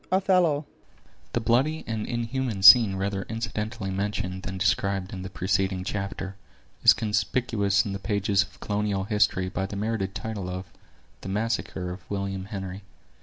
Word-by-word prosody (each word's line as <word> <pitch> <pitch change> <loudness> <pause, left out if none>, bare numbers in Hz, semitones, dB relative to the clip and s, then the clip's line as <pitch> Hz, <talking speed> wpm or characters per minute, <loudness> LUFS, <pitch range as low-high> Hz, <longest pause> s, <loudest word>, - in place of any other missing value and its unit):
—Othello 180 -6 +3 0.7
The - - +2
bloody 130 +8 +1
and 110 -2 -3
inhuman 120 -3 -2
scene 100 0 +9
rather 95 0 -2
incidentally 110 -2 -3
mentioned 95 -1 -2
than 95 0 -5
described 95 0 0
in 95 - -5
the 95 - -6
preceding 95 0 0
chapter, 100 0 -4 0.5
is - - +9
conspicuous 105 -1 +1
in 100 - -3
the 100 - -4
pages 100 -1 +1
of 95 - -7
colonial 105 -2 -1
history 100 -3 +1
by 95 0 -2
the 100 - -7
merited 100 -2 -2
title 100 -2 -4
of 90 +1 -5 0.6
"The - - -6
Massacre 100 -3 -2
of 90 0 -10
William 100 -1 -3
Henry." 95 -2 -6
100 Hz, 150 wpm, -26 LUFS, 95-110 Hz, 0.7 s, scene